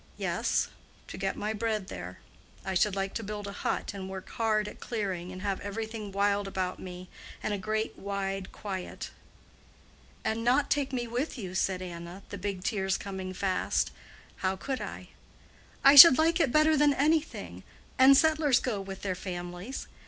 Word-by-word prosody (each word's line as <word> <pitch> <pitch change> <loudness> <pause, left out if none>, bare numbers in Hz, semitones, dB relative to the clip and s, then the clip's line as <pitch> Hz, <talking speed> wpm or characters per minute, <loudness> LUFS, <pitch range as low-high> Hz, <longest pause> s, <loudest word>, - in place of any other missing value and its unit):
"Yes, - - 0 0.4
to - - -7
get - - -2
my 215 +1 -2
bread 215 -2 -2
there. - - -7 0.5
I 190 - -2
should 195 +2 +2
like 195 0 -2
to 225 - -4
build 205 0 -5
a 200 - -5
hut, 200 - -3
and 190 -1 -6
work 190 -1 -7
hard 215 -2 0
at - - -9
clearing, 190 -6 -3
and 185 +1 -8
have 200 -2 -1
everything 215 +1 -5
wild 200 0 +1
about 185 -1 -3
me, 180 0 -8 0.4
and 215 - -1
a - - -1
great 215 +3 -2
wide 195 -1 -3
quiet." 190 -3 -6 1.1
"And 225 +1 -1
not 265 +4 +2
take 280 -2 +1
me 245 -2 -2
with 245 +6 -3
you?" 190 -6 -6
said 185 0 0
Anna, 175 +2 -8
the 200 - -6
big 195 -2 -4
tears 195 -4 0
coming 190 -2 -6
fast. 185 0 0 0.5
"How 190 0 0
could 260 +7 -4
I?" - - -7 0.7
"I 275 - +8
should 285 -1 +12
like 325 +2 +3
it 295 -7 +3
better 310 +2 +4
than 295 -1 +4
anything; 310 +2 0 0.4
and 265 +1 +8
settlers 310 -4 +4
go 215 -6 -2
with 195 -1 -8
their 190 -2 -1
families. 180 +5 -6
205 Hz, 175 wpm, -29 LUFS, 190-245 Hz, 1.1 s, should